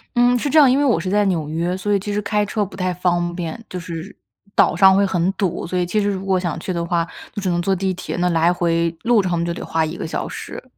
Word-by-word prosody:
嗯， 245 +1 +4
是 265 - -2
这 315 - +5
样， 280 -3 +7
因 260 - +3
为 290 - +2
我 235 -11 +3
是 185 - -3
在 205 +1 +2
纽 165 -6 -1
约， 170 +3 -1
所 190 +2 -2
以 205 - +4
其 205 +2 -4
实 210 - 0
开 210 0 0
车 210 +1 -1
不 190 -1 -8
太 185 -1 -1
方 175 -1 0
便， 170 +2 -4
就 180 - -6
是 170 +2 -7 0.4
岛 - - +3
上 190 -1 +6
会 200 - +4
很 190 -1 +1
堵。 190 -3 -2
所 180 +2 -3
以 180 - +1
其 210 +4 0
实 205 - +1
如 195 -1 -3
果 190 -1 +1
想 170 -3 -3
去 185 - -4
的 170 -1 -2
话， 170 -1 0 0.3
就 205 - -4
只 190 - -1
能 175 - 0
坐 195 +1 +1
地 190 +1 -1
铁， 180 - -5
那 180 0 +1
来 170 +1 +3
回 170 -1 0
路 230 -3 +3
程 175 -2 0
就 170 - -2
得 - - -6
花 160 0 0
1 160 +2 -4
个 - - -4
小 160 - -3
时。 - - -7
185 Hz, 305 characters per minute, -20 LUFS, 170-200 Hz, 0.4 s, 样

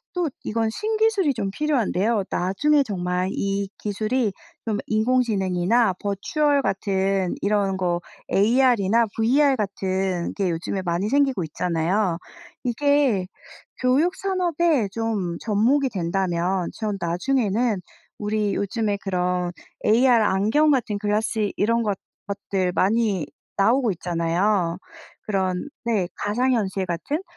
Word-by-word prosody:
또 355 -3 0 0.2
이건 225 0 0
신기술이 430 - +1
좀 210 -5 -3
필요한데요. 225 -5 0
나중에 280 +12 +2
정말 180 -4 -2
이 200 0 -2
기술이 215 +2 -1 0.3
좀 215 - 0
인공지능이나 215 -3 +2
버추얼 280 - +1
같은 195 -4 0
이런 200 -2 +1
거 175 -2 0 0.3
AR이나 230 0 +3
VR 265 +5 +3
같은 190 -3 -2
게 195 -3 0
요즘에 170 +3 -3
많이 175 +3 -1
생기고 270 -6 +2
있잖아요. 170 +3 0 0.5
이게 255 -5 +2 0.5
교육 285 +9 +2
산업에 345 - +1
좀 210 -7 -2
접목이 235 +6 +2
된다면 180 -2 -1
전 210 -3 -3
나중에는 210 +3 0 0.4
우리 210 -1 -1
요즘에 205 0 -1
그런 180 -2 -1 0.4
AR 235 +5 +5 0.2
안경 220 +11 +3
같은 230 -7 +1
글라스 210 0 0
이런 230 +3 +2
것 205 -3 -1 0.3
것들 195 -2 -2
많이 200 -4 +1 0.3
나오고 230 +4 +3
있잖아요. 175 +1 0 0.4
그런 190 +3 -1 0.2
네 215 -6 +1
가상현실 205 -4 0
같은. 230 - -3
205 Hz, 255 characters per minute, -23 LUFS, 190-245 Hz, 0.5 s, AR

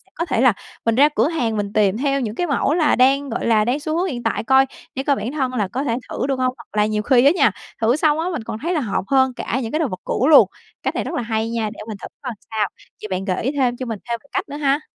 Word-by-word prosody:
có 335 - -2
thể 235 - 0
là 255 -3 +5 0.3
mình 230 -1 +2
ra 285 +4 +6
cửa 225 +5 +3
hàng 240 -10 -1
mình 205 -1 -3
tìm 210 -2 +2
theo 275 +1 0
những 220 -3 -3
cái 355 - -1
mẫu 285 0 +1
là, 320 -3 +3
đang 270 +2 +3
gọi 230 - -3
là, 215 -2 +4
đang 250 +5 0
xu 310 +2 -2
hướng 365 +2 +1
hiện 245 -8 -4
tại 225 - -1
coi 265 +2 +5 0.3
để 270 - -2
coi 280 0 +2
bản 245 -1 -4
thân 265 -4 -1
là 215 -6 0
có 255 +8 -3
thể 235 -5 0
thử - - -2
được 270 -2 -1
hông, 255 0 +1
hoặc 230 -2 -11
là 210 - +4
nhiều 215 0 -1
khi 250 +2 +4
á 285 - +7
nha, - - +4 0.3
thử 230 +3 +3
xong 305 0 +2
á 325 - -1
mình 310 -10 -4
còn 220 - -6
thấy 340 +5 -1
là 325 - +1
hợp 210 -7 -1
hơn 265 -1 +3
cả 245 +1 -2
những 225 - -4
cái 310 - 0
đồ 320 - +1
vật 185 -4 -6
cũ 260 - 0
luôn. 310 - +8 0.4
Cách - - -1
này - - -1
rất - - -5
là - - -1
hay 225 -1 -1
nha, 230 -2 -1
để - - -14
mình 215 - -6
thử - - -6
coi 255 -4 -4 0.2
sao. 215 -2 +1 0.3
Vậy 215 - -5
bạn 190 0 -2
gợi 185 0 -1
ý 260 - 0
thêm 255 -4 0
cho 255 - -4
mình 225 -4 -4
thêm 235 0 -1
một 280 - -24
cách - - -2
nữa 290 - -5
ha. 285 0 +1
255 Hz, 315 wpm, -21 LUFS, 220-280 Hz, 0.4 s, luôn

